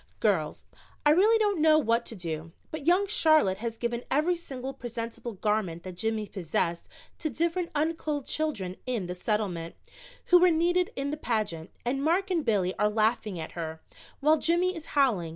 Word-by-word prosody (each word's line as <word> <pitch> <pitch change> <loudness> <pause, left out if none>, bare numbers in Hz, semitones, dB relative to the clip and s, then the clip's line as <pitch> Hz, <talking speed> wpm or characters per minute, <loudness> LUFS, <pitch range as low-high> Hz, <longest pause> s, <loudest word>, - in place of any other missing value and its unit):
"Girls, - - 0 0.4
I 295 - +7
really 415 +8 +5
don't 410 -6 +1
know 310 0 +6
what 230 -5 +1
to 230 - -6
do, 165 -3 -5 0.2
but 310 -1 -6
young 365 +4 +4
Charlotte 310 - +3
has 230 0 -4
given 235 0 -2
every 310 +6 +2
single 270 -6 -6
presentable 235 -1 -6
garment 195 -5 -1
that 185 - -6
Jimmy 220 +3 -1
possessed 170 -2 -2 0.3
to 310 - -1
different 335 +5 -1
unclothed 305 -2 -1
children 210 -13 -2
in 235 -7 -1
the 180 - -4
Settlement, 180 -4 -2 0.5
who 355 - +8
were 365 +1 +6
needed 350 +2 +2
in 275 +1 -2
the 300 - -3
pageant, 210 - -2 0.2
and 270 +3 0
Mark 370 +5 +1
and 335 -4 +1
Billy 195 -6 +1
are 210 - +3
laughing 215 -3 0
at 160 - -6
her, 160 -2 -5 0.4
while 305 +2 +5
Jimmy 350 +3 +2
is 325 -2 -8
howling. 220 -12 +3
245 Hz, 175 wpm, -28 LUFS, 195-320 Hz, 0.5 s, who